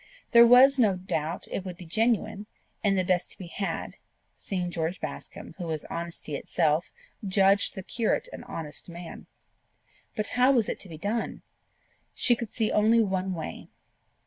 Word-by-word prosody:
There 235 -1 +9
was 260 +3 +7
no 210 -6 +4
doubt 170 -3 -3
it 195 - -3
would 180 -2 -7
be 180 - -10
genuine, 210 +1 0 0.4
and 200 -2 +3
the 185 - +2
best 180 -1 +1
to - - -14
be 185 - -8
had, 195 +3 -4 0.4
seeing 180 -3 -3
George 165 +1 -2
Bascombe, - - -7
who 175 - -4
was 155 -2 -3
honesty 170 -3 -5
itself, 155 +2 0 0.3
judged 195 +1 +3
the 190 - -6
curate 230 - 0
an - - -8
honest 160 +1 -5
man. 170 0 -9 0.9
But 215 -1 -1
how 250 +2 +4
was 235 -5 +3
it - - -3
to 190 - -9
be 160 - -8
done? 210 +7 -3 0.7
She 240 - +3
could 230 -2 -5
see 220 0 0
only 225 +2 +4
one 190 -2 -1
way. 160 - -6
190 Hz, 170 wpm, -27 LUFS, 170-220 Hz, 0.9 s, There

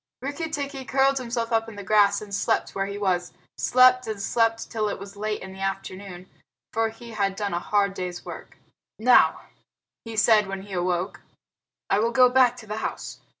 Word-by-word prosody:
Rikki 285 +5 -4
tikki 280 -3 -4
curled 270 +1 +2
himself 235 -1 -3
up 225 0 +1
in 220 - -11
the 200 - -7
grass 200 0 +3
and 205 -1 -11
slept - - 0
where 195 0 -2
he 200 0 -5
was 180 -3 -1 0.2
slept 255 0 +4
and 215 -2 -4
slept 225 +2 0
till 215 -2 -1
it - - -4
was 200 +1 -10
late 210 +1 -3
in 190 0 -9
the 190 - -12
afternoon, 190 -1 -5 0.5
for 225 0 +1
he 230 +1 -12
had 200 -3 -1
done 200 -2 -3
a 175 - 0
hard 200 +1 +1
day's 180 -2 -5
work. - - -9 0.4
"Now," 245 +3 +5 0.6
he 225 -1 -8
said, 215 -2 +5
when 195 0 -5
he 200 -1 -10
awoke, 180 0 -1 0.7
"I 195 - +2
will 230 +2 +2
go 250 +1 +5
back 250 -1 +4
to 225 - -11
the 210 0 -5
house. - - -5
215 Hz, 195 wpm, -25 LUFS, 195-235 Hz, 0.7 s, Now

